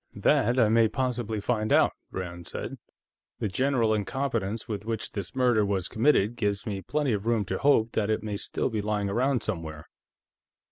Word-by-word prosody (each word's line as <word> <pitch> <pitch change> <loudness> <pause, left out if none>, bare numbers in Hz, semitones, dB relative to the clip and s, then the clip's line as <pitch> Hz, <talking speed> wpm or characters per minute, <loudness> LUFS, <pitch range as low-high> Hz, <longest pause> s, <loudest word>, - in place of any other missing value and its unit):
"That 120 +4 +2
I 115 -4 +5
may 115 +1 +4
possibly 120 -2 -2
find 110 0 -1
out," - - +5 0.2
Rand 85 -2 -6
said. - - -6 0.6
"The - - -1
general 120 +1 +1
incompetence 110 -1 -2
with 105 -3 -4
which 110 -1 -3
this 100 -1 -6
murder 125 -4 +3
was 100 -3 0
committed 115 -3 +2
gives 100 -2 -1
me 100 -3 -3
plenty 145 - 0
of 105 +1 -3
room 115 -3 +2
to - - -3
hope 115 -6 +3
that 110 -1 0
it 110 0 0
may 105 -2 -3
still 125 - -2
be 110 -2 -1
lying 105 -1 -1
around 125 +1 +1
somewhere." 80 -7 -4
110 Hz, 180 wpm, -27 LUFS, 100-120 Hz, 0.6 s, I